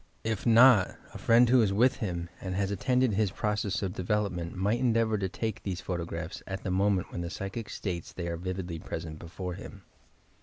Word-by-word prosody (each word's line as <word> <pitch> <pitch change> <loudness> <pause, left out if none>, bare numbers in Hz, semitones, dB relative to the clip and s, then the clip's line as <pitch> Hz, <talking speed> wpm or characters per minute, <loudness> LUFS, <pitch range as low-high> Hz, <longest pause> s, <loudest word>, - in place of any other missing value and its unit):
If 110 0 -2
not, 115 -3 +7 0.2
a - - -8
friend 120 +1 +5
who 125 +1 +5
is 105 -3 +2
with 120 +7 +3
him 85 -8 -3
and 95 -1 -3
has 100 0 0
attended 125 +4 +2
his 105 0 +2
process 105 +1 -1
of 95 -2 -2
development 90 -3 -1
might 100 +5 +1
endeavour 115 -3 +2
to 95 -1 -1
take 110 +2 -3
these 95 -3 -3
photo 85 -3 -3
graphs 85 0 -6
at 95 0 -5
the 95 - -2
moment 95 0 +1
when 85 - -4
the 85 - -4
psychic 100 +5 -5
states 85 -5 -4
they 85 -2 -5
are 85 - -2
vividly 90 -1 -4
present 80 -1 -6
before 90 +2 -6
him. 100 +1 -10
95 Hz, 200 wpm, -29 LUFS, 90-110 Hz, 0.2 s, not